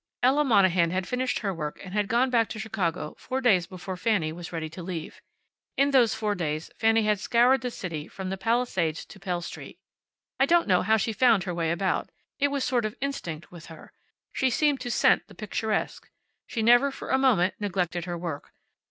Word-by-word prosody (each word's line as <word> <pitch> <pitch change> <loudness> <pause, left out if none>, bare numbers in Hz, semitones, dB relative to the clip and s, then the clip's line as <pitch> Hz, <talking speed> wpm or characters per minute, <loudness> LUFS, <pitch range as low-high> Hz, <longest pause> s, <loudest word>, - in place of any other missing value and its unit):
Ella 270 +4 +4
Monahan 185 - +4
had 185 +1 -2
finished 250 0 -1
her 200 -3 -2
work 150 -3 -5
and 185 -1 -9
had 205 -1 0
gone 245 +4 +2
back 230 -3 +2
to - - -6
Chicago 190 -8 -2
four 260 - -3
days 195 -9 +3
before 185 0 -7
Fanny 180 -5 0
was 170 0 -8
ready 165 -2 -3
to 165 +3 -9
leave. 170 -2 -6 0.6
In 280 +1 +3
those 250 -5 +4
four 210 -1 -1
days 155 -4 -3
Fanny 225 0 +3
had 210 -1 +1
scoured 245 +5 +3
the 250 - -2
city 165 -8 -6
from 190 -1 -6
the - - -1
Palisades 190 -8 0
to 195 - -14
Pell 180 -3 -3
street. 170 - -9 0.6
I 270 - +4
don't 340 +1 +3
know 180 -3 +4
how 220 +3 +3
she 220 +1 -1
found 225 -4 +4
her 180 -1 -3
way 165 -1 -1
about. 185 +2 -1 0.3
It 285 - +3
was 280 -1 -2
a - - 0
sort 245 -3 +1
of 215 - -4
instinct 175 - -5
with 170 -3 -12
her. 160 -2 -13 0.4
She 265 - +1
seemed 285 +2 +1
to 245 - -4
scent - - +3
the - - -15
picturesque. 215 0 -3 0.4
She 225 - -2
never 245 +5 +5
for 270 - -8
a 265 - +3
moment 215 -9 +3
neglected 180 -4 -2
her 175 -1 -4
work. 165 -4 -6
205 Hz, 210 wpm, -26 LUFS, 175-245 Hz, 0.6 s, never